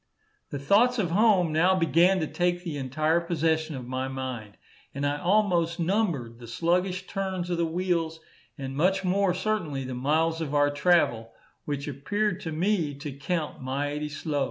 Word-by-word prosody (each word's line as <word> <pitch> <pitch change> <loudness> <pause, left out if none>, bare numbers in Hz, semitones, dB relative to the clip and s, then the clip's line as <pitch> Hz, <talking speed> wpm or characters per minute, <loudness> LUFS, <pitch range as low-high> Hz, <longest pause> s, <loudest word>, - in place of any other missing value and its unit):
The 145 - -4
thoughts 215 - +3
of 185 -7 0
home 195 -4 +4
now 180 +4 +4
began 175 +3 +4
to - - +1
take 175 +2 -1
the 165 -5 -4
entire 155 +5 +1
possession 160 -2 0
of 130 -2 -6
my 130 +1 -3
mind, 130 -6 -6 0.4
and 140 +1 -2
I 145 +1 0
almost 180 -3 +2
numbered 165 - -1
the 120 - -10
sluggish 180 +8 0
turns 190 -3 -3
of 175 - 0
the 170 - +2
wheels, 165 -1 -1 0.4
and 135 -1 -5
much 190 +6 +2
more 190 0 +2
certainly 185 -9 -2
the 130 0 -5
miles 160 +6 +1
of 150 -2 -3
our 145 0 +4
travel, 145 -9 +2 0.3
which 145 -1 -3
appeared 190 +8 -1
to 160 - -4
me 165 -3 0
to 145 +1 -6
count 150 +3 -3
mighty 145 +3 -2
slow. 150 -1 -3
165 Hz, 170 wpm, -27 LUFS, 145-180 Hz, 0.4 s, home